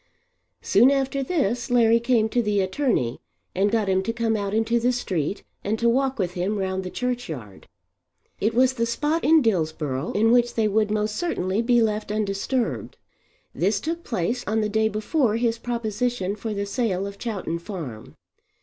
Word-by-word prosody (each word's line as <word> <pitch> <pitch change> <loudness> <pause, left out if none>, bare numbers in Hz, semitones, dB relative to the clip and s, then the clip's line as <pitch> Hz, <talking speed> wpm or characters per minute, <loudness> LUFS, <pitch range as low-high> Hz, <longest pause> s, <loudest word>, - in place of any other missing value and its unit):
Soon 250 - +5
after 275 0 0
this 260 - -1
Larry 230 -2 +4
came 235 -2 +2
to 240 - +1
the 210 -2 +1
attorney 190 - 0 0.3
and 195 +2 +2
got 220 -1 +1
him 190 0 +2
to 230 - -2
come 230 -1 0
out 200 -2 -2
into 225 +2 +1
the 245 +2 +2
street 190 - -2 0.2
and 210 +2 -1
to 235 - +1
walk 265 +3 +2
with 185 -5 -1
him 185 +4 -1
round 190 -1 -2
the 185 - -5
churchyard. 165 - -5 0.7
It 220 +2 0
was 255 +1 +4
the 230 -2 -1
spot 300 +7 0
in 315 -1 +5
Dillsborough 160 - -1
in 225 +2 +3
which 240 0 +3
they 220 -2 +2
would 210 +1 +1
most 210 0 -1
certainly 210 - -1
be 240 0 +3
left 215 -1 -1
undisturbed. 205 - -2 0.6
This 195 +7 +1
took 330 +5 -4
place 230 +2 -2
on 220 +1 +1
the 210 - 0
day 220 +1 +2
before 215 +3 0
his 230 0 0
proposition 235 -3 -2
for 220 +1 -5
the 200 -1 -2
sale 200 -3 -1
of 200 0 -8
Chowton 195 -7 -3
Farm. 160 - -8
220 Hz, 175 wpm, -24 LUFS, 195-240 Hz, 0.7 s, Soon